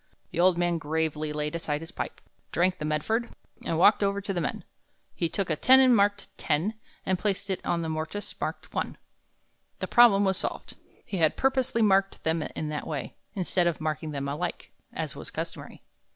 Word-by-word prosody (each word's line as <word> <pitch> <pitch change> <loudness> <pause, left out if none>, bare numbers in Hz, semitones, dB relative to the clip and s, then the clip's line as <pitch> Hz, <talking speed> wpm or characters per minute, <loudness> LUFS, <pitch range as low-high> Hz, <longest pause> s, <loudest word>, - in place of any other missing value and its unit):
The - - -4
old 180 0 +5
man 175 -1 +1
gravely 155 0 -1
laid 150 0 -2
aside 150 -3 -2
his 165 - -8
pipe, - - -5 0.3
drank 180 +1 +1
the 150 - -3
Medford, 220 +11 -1 0.3
and 165 - -1
walked 205 +6 +6
over 200 0 +1
to 200 0 -3
the 175 - -1
men. 150 - -3 0.5
He 170 - -1
took 195 -2 -2
a - - +2
tenon 260 - +7
marked 205 -2 +2
ten 160 +8 +1 0.3
and 185 -1 +1
placed 200 0 -1
it 190 - -2
in 170 -1 0
a - - -2
mortise 160 +6 -4
marked - - -4
one. - - -2 0.8
The - - -3
problem 210 -5 +6
was 190 -1 +2
solved. - - -4 0.3
He 195 - -4
had 160 -3 +2
purposely 260 -3 +2
marked 195 -1 +2
them 160 0 +1
in 155 0 -4
that 150 -1 -4
way, 150 -5 -4 0.2
instead 180 -2 +1
of 170 - 0
marking 155 -1 -2
them 140 -2 -3
alike, 155 +5 -4 0.2
as - - -4
was - - -7
customary. - - -7
175 Hz, 190 wpm, -27 LUFS, 155-200 Hz, 0.8 s, tenon